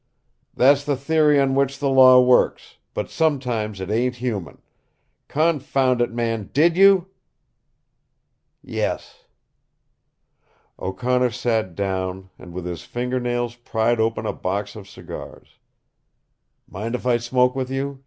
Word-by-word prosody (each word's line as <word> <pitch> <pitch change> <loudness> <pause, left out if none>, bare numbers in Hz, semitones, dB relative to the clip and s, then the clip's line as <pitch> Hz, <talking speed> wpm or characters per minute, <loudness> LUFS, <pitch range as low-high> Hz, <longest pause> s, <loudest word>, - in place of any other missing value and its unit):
"That's 140 +2 +4
the 145 -1 0
theory 150 +1 +3
on 135 -1 +2
which 140 0 0
the 145 - -1
law 130 -1 +7
works, 125 0 +2 0.2
but - - -4
sometimes 125 -10 -1
it 95 +2 -5
ain't 125 +3 0
human. 115 -7 -5 0.6
Confound 140 -5 +1
it, 120 - 0
man, 115 -3 -3
DID 165 +4 +3
YOU?" 195 -1 +5 1.6
"Yes." - - -4 1.5
O'Connor 125 +6 0
sat 115 -6 -2
down 95 -1 -3
and 90 - -12
with 90 0 -6
his 90 -2 -5
finger 125 +1 -3
nails 120 -1 -2
pried 120 -1 -1
open 110 0 0
the - - -2
box 100 +2 -4
of 100 -2 -11
cigars. 100 - -11 1.1
"Mind 115 +5 -5
if 125 - -6
I 125 -1 +3
smoke 125 +2 +1
with 130 -1 -3
you?" 135 +1 -4
125 Hz, 130 wpm, -22 LUFS, 110-135 Hz, 1.6 s, law